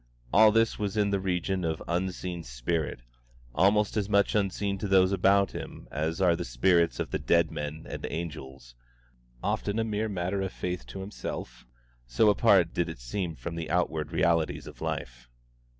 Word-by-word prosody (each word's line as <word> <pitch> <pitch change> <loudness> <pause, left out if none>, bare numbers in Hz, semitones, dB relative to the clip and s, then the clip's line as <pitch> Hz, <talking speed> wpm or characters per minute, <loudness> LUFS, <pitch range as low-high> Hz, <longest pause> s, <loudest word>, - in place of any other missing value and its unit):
All 110 +2 +7
this 115 +1 +2
was 105 0 -2
in 100 -1 +2
the 100 - +1
region 95 0 -1
of 80 -1 -2
unseen 90 0 -2
spirit, 60 +3 -3 0.5
almost 100 - +3
as 105 -2 -1
much 100 -1 +3
unseen 100 -1 0
to 105 - -2
those 95 -1 +4
about 100 +1 +3
him - - -8
as 80 +4 -2
are 90 -3 +4
the - - -3
spirits 85 +8 +2
of - - -3
the - - -1
dead - - +2
men 75 +2 -5
and - - -5
angels, 70 -7 -7 0.7
often 100 +1 -1
a 115 - +2
mere 110 0 -1
matter 95 0 -2
of 95 -1 -3
faith 90 -1 -4
to 95 - -7
himself, 60 - -7 0.4
so 60 - +4
apart 100 -5 +4
did 85 -1 0
it 80 - -6
seem 80 +8 -3
from 70 +8 -6
the 85 -2 -5
outward 80 -3 0
realities 85 -2 +1
of - - -12
life. - - -5
90 Hz, 175 wpm, -28 LUFS, 80-100 Hz, 0.7 s, All